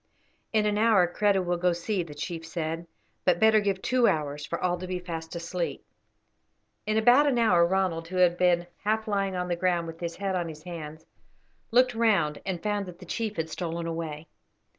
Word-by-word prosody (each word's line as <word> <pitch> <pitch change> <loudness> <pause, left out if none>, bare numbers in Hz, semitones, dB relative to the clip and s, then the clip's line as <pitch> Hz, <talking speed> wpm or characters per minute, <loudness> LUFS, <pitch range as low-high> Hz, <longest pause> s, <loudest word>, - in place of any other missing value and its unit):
"In 215 -1 +2
an 210 0 +1
hour 215 -5 +5
Kreta 195 +2 +1
will 175 0 0
go 180 0 +2
see," 180 +3 -2
the 155 -4 -8
chief 165 +3 -5
said; 165 0 -4 0.4
"but 175 -2 +3
better 220 +1 +6
give 200 -2 -1
two 255 -2 +3
hours 150 -5 -1
for 170 - -3
all 180 -1 +1
to 185 - -6
be 180 0 -2
fast 165 -2 -6
asleep." 170 +1 -4 1.0
In 215 0 +1
about 245 +6 +6
an 265 -4 +2
hour 190 -7 +4
Ronald, 180 -3 0
who 185 - -7
had 180 -1 +4
been 175 -1 +2 0.2
half 220 +2 0
lying 195 -2 0
on 180 0 -2
the 175 - 0
ground 175 -1 +1
with 165 0 -8
his 170 -1 -4
head 195 0 -2
on 175 -2 -1
his 155 -1 -10
hands, 160 -3 -8 0.6
looked 250 +1 +4
round 200 -10 +2
and 180 -3 -3
found 205 -2 -1
that 175 -1 -9
the - - -12
chief 220 -2 -3
had 160 0 -3
stolen 170 -1 -3
away. 165 -2 -5
180 Hz, 205 wpm, -27 LUFS, 165-205 Hz, 1.0 s, better